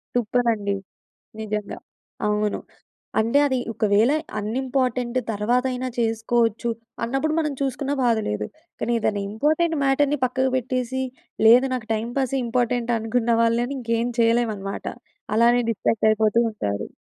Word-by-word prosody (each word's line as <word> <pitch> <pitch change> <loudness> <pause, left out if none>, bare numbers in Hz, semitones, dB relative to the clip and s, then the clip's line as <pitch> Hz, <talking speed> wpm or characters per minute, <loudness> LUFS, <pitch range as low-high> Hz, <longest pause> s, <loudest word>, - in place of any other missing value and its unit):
టుప్రా 245 0 +2
అండీ. 200 -1 -2 0.6
నిజంగా. 210 -1 -4 0.5
అవును. 210 0 0 0.6
అంటే 230 +6 +3
అది 260 -2 +1 0.2
ఒకవేళ 215 +5 +3 0.3
అన్‌ఇంపార్టెంట్ 250 +2 -1
తర్వాతైనా 250 +4 0
చేసుకోవచ్చు, 230 0 +1 0.3
అన్నప్పుడు 270 +6 0
మనం 300 -3 -1
చూసుకున్న 275 +1 -1
బాధ 235 -2 +3
లేదు. 105 0 -2 0.3
కాని 240 - 0
ఏదన్న 205 -1 0
ఇంపార్టెంట్ 310 +9 +1
మ్యాటర్‌ని 285 +2 +2
పక్కకి 260 +1 0
పెట్టేసి, 255 +1 -1 0.5
లేదు 245 +3 +7
నాకు 230 -4 -4
టైంపాసే 245 +4 -1
ఇంపార్టెంట్ 240 0 0
అనుకున్న 230 +1 0
వాళ్ళని 235 +4 +1
ఇంకేం 230 0 0
చేయలేం 230 0 +3
అన్నమాట. 195 0 -6 0.5
అలానే 240 +2 +5
డిస్ట్రాక్ట్ 220 +1 +1
అయిపోతూ 215 +1 +2
ఉంటారు. 100 - -3
235 Hz, 120 wpm, -23 LUFS, 220-255 Hz, 0.6 s, లేదు